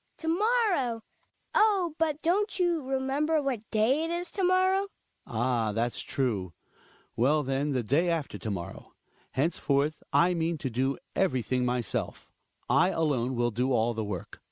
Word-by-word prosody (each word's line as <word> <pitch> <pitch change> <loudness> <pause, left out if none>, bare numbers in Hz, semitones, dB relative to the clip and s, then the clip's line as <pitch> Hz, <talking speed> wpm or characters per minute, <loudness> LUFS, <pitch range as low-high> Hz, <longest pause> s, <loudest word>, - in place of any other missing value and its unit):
Hedvig. - - -45
To 320 - -7
morrow! 360 - +1 0.5
Oh! 395 -6 +3
but 310 -2 0
don't 405 +5 +1
you 350 -3 +1
remember 270 +4 0
what 255 -7 -3
day 235 +8 +2
it 325 - -2
is 345 +1 -3
to 390 - -2
morrow? 375 +2 +3 0.4
Hjalmar. - - -4
Ah! 115 -4 +1
that's 115 +2 -1
true. 105 -10 -2 0.6
Well, 145 +6 +3
then, 135 +2 -1
the 125 -2 0
day 150 +10 +2
after 165 -4 -2
to 110 - -4
morrow. 95 -4 -6 0.4
Henceforth 145 0 0
I 180 +1 +4
mean 165 -1 -1
to 135 -3 -4
do 130 +4 0 0.2
everything 130 - +1
myself; 125 -1 -3 0.4
I 180 +3 +4
alone 135 -8 0
will 120 0 +1
do 125 +4 0
all 120 0 +2
the 110 -1 -3
work. 100 -4 -6
165 Hz, 160 wpm, -28 LUFS, -, 0.6 s, I